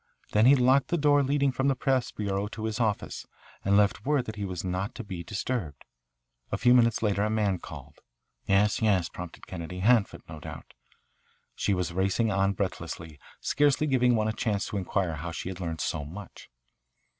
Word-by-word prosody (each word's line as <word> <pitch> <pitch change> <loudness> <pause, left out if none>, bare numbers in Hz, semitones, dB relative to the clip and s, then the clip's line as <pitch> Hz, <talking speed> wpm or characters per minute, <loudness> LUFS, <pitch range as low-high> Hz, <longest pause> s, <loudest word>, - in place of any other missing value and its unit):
Then 110 +3 +5
he 140 - +8
locked 130 +1 +4
the 175 - 0
door 145 -1 +4
leading 140 0 +2
from 135 +1 0
the 135 - +3
press 130 -1 +1
bureau 100 -1 -2
to 110 +1 -7
his 110 +1 -2
office, 110 -3 -1 0.4
and 100 +1 +3
left 100 -2 +2
word 145 -1 +1
that 110 - -6
he 105 -1 -3
was 90 -3 -4
not 95 +6 -3
to 125 - -6
be 95 -4 -6
disturbed. 100 - -4 0.7
A - - 0
few 125 0 +5
minutes 115 -2 +4
later 100 -1 +1
a 105 - +1
man 105 -4 +1
called." - - -11 0.5
"Yes, 100 +3 +3
yes," 100 -6 +2
prompted 90 -2 -9
Kennedy. 90 0 -6
"Hanford, 115 0 +3
no 80 -1 -9
doubt." - - -9 0.8
She 100 - 0
was 90 -2 -2
racing 95 +4 +1
on 95 0 +2
breathlessly, 85 -5 -5 0.2
scarcely 145 +1 +2
giving 125 -4 +3
one 110 -1 +1
a 110 - 0
chance 105 -2 -1
to 105 - -3
inquire 95 -3 -1
how 85 +4 -5
she 85 - -5
had 95 -1 -7
learned 80 -4 -4
so 75 - -2
much. 90 +7 -10
105 Hz, 190 wpm, -28 LUFS, 90-125 Hz, 0.8 s, he